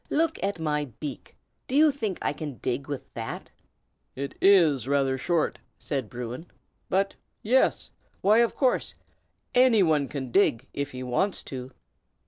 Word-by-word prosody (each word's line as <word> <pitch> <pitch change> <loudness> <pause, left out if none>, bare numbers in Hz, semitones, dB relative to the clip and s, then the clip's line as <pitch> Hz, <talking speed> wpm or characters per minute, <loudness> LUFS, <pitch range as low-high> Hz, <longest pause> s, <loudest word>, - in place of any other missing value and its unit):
"Look 320 -4 0
at 200 -1 -1
my 150 -2 -1
beak! 145 -4 -7 0.3
Do 260 - -3
you 305 +1 +6
think 220 -9 -3
I - - 0
can 145 -2 -6
dig 125 +5 -3
with 145 -3 -6
that?" 115 -1 -6 0.6
"It 140 +1 -4
is 160 - +5
rather 135 -1 +2
short," 160 +5 0 0.2
said 135 -7 -3
Bruin; 125 +6 -6 0.4
"but 195 +1 +1 0.3
yes! 255 +5 +2 0.3
why, 210 +3 +5
of 235 -1 +2
course, 260 -3 +1 0.6
any 245 -5 +5
one 150 -4 +2
can 130 -3 -5
dig, 130 - +3
if 140 0 -3
he 130 -1 -7
wants 130 +11 0
to." 130 -1 -5
150 Hz, 150 wpm, -27 LUFS, 130-200 Hz, 0.6 s, you